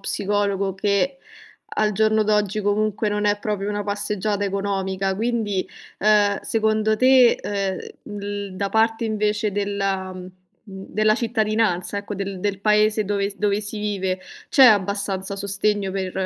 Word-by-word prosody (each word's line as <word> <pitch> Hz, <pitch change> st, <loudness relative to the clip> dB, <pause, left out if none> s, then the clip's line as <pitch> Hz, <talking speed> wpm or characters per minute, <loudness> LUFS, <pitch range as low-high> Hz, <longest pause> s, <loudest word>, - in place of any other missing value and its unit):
psicologo, 200 Hz, -1 st, -1 dB
che 205 Hz, +8 st, 0 dB, 0.5 s
al 215 Hz, 0 st, +1 dB
giorno 215 Hz, +1 st, +2 dB
d'oggi 210 Hz, 0 st, +1 dB
comunque 210 Hz, +1 st, 0 dB
non 210 Hz, 0 st, -1 dB
è 205 Hz, 0 st, +2 dB
proprio 205 Hz, -1 st, -3 dB
una 205 Hz, -1 st, -2 dB
passeggiata 205 Hz, 0 st, -1 dB
economica, 195 Hz, -1 st, -1 dB
quindi, 215 Hz, -3 st, -1 dB, 0.4 s
uhm, 205 Hz, -1 st, +3 dB
secondo 220 Hz, -1 st, +1 dB
te, 255 Hz, -1 st, +5 dB
uhm, 200 Hz, +1 st, -4 dB
l 200 Hz, -1 st, -5 dB
da 200 Hz, 0 st, -1 dB
parte 225 Hz, +1 st, +1 dB
invece 210 Hz, -1 st, 0 dB
della 195 Hz, -2 st, -2 dB
mhmm, 185 Hz, -, -8 dB, 0.4 s
mhmm, 195 Hz, -2 st, -10 dB
della 215 Hz, 0 st, +2 dB
cittadinanza 215 Hz, -5 st, 0 dB
ecco, 205 Hz, 0 st, -6 dB
del 195 Hz, -1 st, -4 dB
del 200 Hz, 0 st, -1 dB
paese 210 Hz, +1 st, +2 dB
dove 200 Hz, 0 st, -1 dB
s 200 Hz, -, -12 dB
dove 205 Hz, 0 st, 0 dB
si 210 Hz, +1 st, -5 dB
vive, 190 Hz, -3 st, -2 dB, 0.3 s
c'è 270 Hz, -, +6 dB
abbastanza 200 Hz, -3 st, +2 dB
sostegno 200 Hz, 0 st, 0 dB
per 190 Hz, -2 st, -3 dB
205 Hz, 145 wpm, -22 LUFS, 195-215 Hz, 0.5 s, c'è